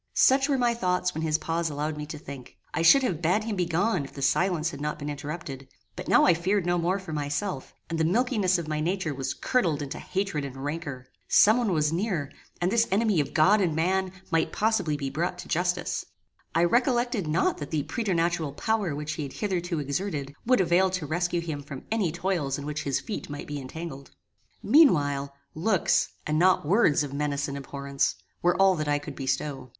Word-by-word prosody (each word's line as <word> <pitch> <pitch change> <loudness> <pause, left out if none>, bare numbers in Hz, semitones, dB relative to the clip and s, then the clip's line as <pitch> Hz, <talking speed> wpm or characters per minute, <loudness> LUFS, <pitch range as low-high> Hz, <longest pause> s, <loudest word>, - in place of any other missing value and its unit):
Such 270 +2 +4
were 275 - +2
my 240 -2 +2
thoughts 180 -4 0
when 160 - -4
his 155 -1 +1
pause 165 +1 -1
allowed 150 +1 -3
me 150 0 -6
to 155 - -6
think. 140 -4 -10 0.2
I - - 0
should 270 +12 +7
have 175 -10 -1
bad 180 +6 +2
him 220 -1 -3
begone 180 0 +1
if 135 - -10
the 140 - -5
silence 170 +3 +1
had 140 -2 -8
not 150 0 -2
been 150 0 -4
interrupted; 145 -2 -6 0.3
but 180 - -7
now - - +5
I 180 - +6
feared 185 +3 0
no 175 0 +1
more 175 +3 +1
for 190 -5 -7
myself; 145 +1 -3
and 165 -1 -3
the - - +3
milkiness 200 0 +2
of 170 -2 -5
my 155 -1 -2
nature 175 -1 -1
was 135 -1 -3
curdled 175 - +1
into 140 +2 -6
hatred 190 -6 -2
and 135 -1 -7
rancour. 145 -4 -4 0.2
Some 215 +3 +6
one 230 -5 0
was 155 -2 +1
near, 170 -6 -1 0.3
and 175 +2 +1
this 230 +1 +3
enemy 205 -2 +2
of 145 - -2
God 200 +7 +5
and 170 -5 +1
man 185 +3 +1 0.2
might 165 -1 +1
possibly 205 -9 +1
be 135 -2 -4
brought 175 +5 -2
to 180 - -9
justice. 175 +1 -1 0.5
I 165 - +4
reflected 240 - +2
not 160 +4 +1
that 145 - -6
the 155 -3 -1
preternatural 170 - -1
power 205 -3 -1
which 150 +1 -4
he 160 - -5
had 140 -3 -5
hitherto 180 -4 -2
exerted, 140 -1 -3
would 255 -4 +4
avail 185 +2 +3
to 180 -4 -3
rescue 175 +3 -1
him 155 -4 -4
from 140 -2 -9
any 210 -7 +1
toils 170 -5 -1
in 145 - -6
which 150 +1 -4
his 140 -2 0
feet 215 - -6
might 145 0 -6
be 145 -1 -5
entangled. 140 0 -8 0.5
Meanwhile, 145 - +4 0.2
looks, 185 +3 +2 0.2
and 155 +1 0
not 185 -2 +4
words 165 -4 +3
of 140 -2 -6
menace 145 0 -1
and 140 - -5
abhorrence, 140 -2 -2 0.3
were 175 +1 +2
all 195 -1 +6
that 155 -1 -2
I 145 0 +2
could 145 - -8
bestow. 135 0 -3
165 Hz, 205 wpm, -27 LUFS, 145-190 Hz, 0.5 s, should